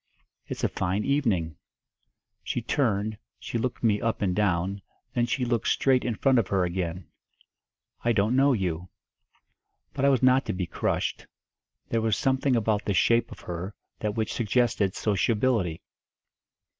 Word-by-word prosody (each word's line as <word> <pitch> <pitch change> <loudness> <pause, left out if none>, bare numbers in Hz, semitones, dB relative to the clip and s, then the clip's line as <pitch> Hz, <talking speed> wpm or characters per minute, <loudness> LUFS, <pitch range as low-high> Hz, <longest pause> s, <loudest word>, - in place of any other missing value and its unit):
"It's - - -6
a - - +4
fine 95 +3 -1
evening." 105 - 0 0.8
She - - -2
turned, 110 -5 0 0.2
she 115 - -4
looked 125 +1 -3
me 105 -3 +2
up 115 -2 -1
and 90 -2 +1
down, 95 -1 0 0.3
then 120 0 +1
she 125 +1 0
looked 120 -2 0
straight 130 -2 +3
in 120 -3 -1
front 130 +2 +3
of 105 - 0
her 95 -2 +1
again. 90 -1 -3 1.0
"I 120 - +3
don't 110 +2 +2
know 135 +1 +5
you." 90 -4 -2 1.0
But - - -3
I 140 - +6
was 130 -2 +2
not 130 +1 +5
to - - -1
be 90 -1 -2
crushed; - - -2 0.6
there 115 - +1
was 110 -2 +1
something 135 0 +1
about 110 -2 +1
the 100 - 0
shape 115 +5 +3
of - - -10
her 90 +4 -6 0.2
that 105 -1 -2
which 110 -2 -1
suggested 115 -4 +1
sociability. 105 -3 +1
110 Hz, 155 wpm, -27 LUFS, 95-125 Hz, 1.0 s, I